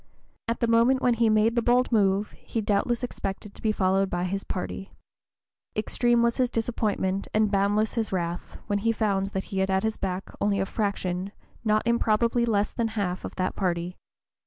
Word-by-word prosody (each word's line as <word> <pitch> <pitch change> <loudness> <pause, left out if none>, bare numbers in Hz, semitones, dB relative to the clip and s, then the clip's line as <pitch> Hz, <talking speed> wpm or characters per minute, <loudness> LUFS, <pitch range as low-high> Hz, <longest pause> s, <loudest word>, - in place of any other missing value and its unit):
At 230 0 -2
the 235 - +3
moment 230 +3 +4
when 245 - +4
he 230 -1 +2
made 215 +2 +3
the 235 - +3
bold 245 +2 +2
move, 200 -2 +2
he 230 - -5
doubtless 220 +3 0
expected 200 -3 -5
to - - -13
be 220 - +2
followed 195 -1 +1
by 175 -1 -1
his 195 +2 -2
party. 190 +1 -5 0.8
Extreme 240 +2 +2
was 235 0 +1
his 255 -2 +2
disappointment 215 -5 -1
and 215 -1 +3
boundless 205 +2 +2
his 225 -3 -1
wrath, 175 -2 -3
when 205 -1 0
he 230 +3 +2
found 200 -4 0
that 190 -1 -3
he 190 - 0
had 190 0 +1
at 190 0 +1
his 220 0 -1
back 190 0 -4
only 200 -1 +2
a 195 - +1
fraction, 195 -2 -2 0.3
not 215 -1 +2
improbably 235 0 +2
less 205 -2 +1
than 230 -1 -1
half, 185 -3 -1
of - - -6
that 185 0 -1
party. 180 -1 -1
210 Hz, 190 wpm, -26 LUFS, 195-230 Hz, 0.8 s, moment